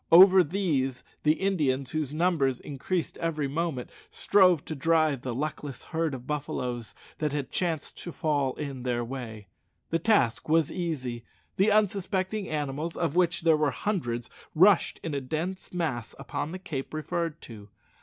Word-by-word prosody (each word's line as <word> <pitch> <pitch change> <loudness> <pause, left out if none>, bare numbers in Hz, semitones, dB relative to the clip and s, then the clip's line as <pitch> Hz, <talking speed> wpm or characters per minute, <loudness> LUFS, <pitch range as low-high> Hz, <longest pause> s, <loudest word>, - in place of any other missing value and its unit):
Over 185 +2 +9
these 145 -7 -1 0.2
the 150 - +4
Indians, 150 -9 0
whose 155 -3 -2
numbers 155 -5 +1
increased 160 +5 -3
every 155 -4 -1
moment, 150 -3 -2 0.2
strove 180 -6 +4
to - - -4
drive 155 -2 +2
the 125 -2 -4
luckless 145 0 -4
herd 160 -3 -1
of 125 -1 -9
buffaloes 125 -5 -3 0.2
that 150 -2 0
had 145 -3 -3
chanced 165 -4 -2
to 175 - -6
fall 145 -5 0
in 140 -4 -5
their 120 -1 -1
way. 115 -4 -6 0.5
The 165 - +2
task 165 - +2
was 160 -1 +3
easy. 130 -10 -3 0.3
The 195 +3 +4
unsuspecting 200 -1 +1
animals, 150 +2 -3
of 165 -3 -1
which 180 -1 +2
there 165 -1 +5
were 150 -1 +2
hundreds, 125 - -2 0.3
rushed 185 +3 +5
in 160 - -3
a 140 - -1
dense 160 +8 -4
mass 155 -10 -2
upon 140 +2 -4
the 185 - -4
cape 155 -7 -5
referred 165 +1 -2
to. 105 -3 -11
155 Hz, 155 wpm, -28 LUFS, 135-175 Hz, 0.5 s, Over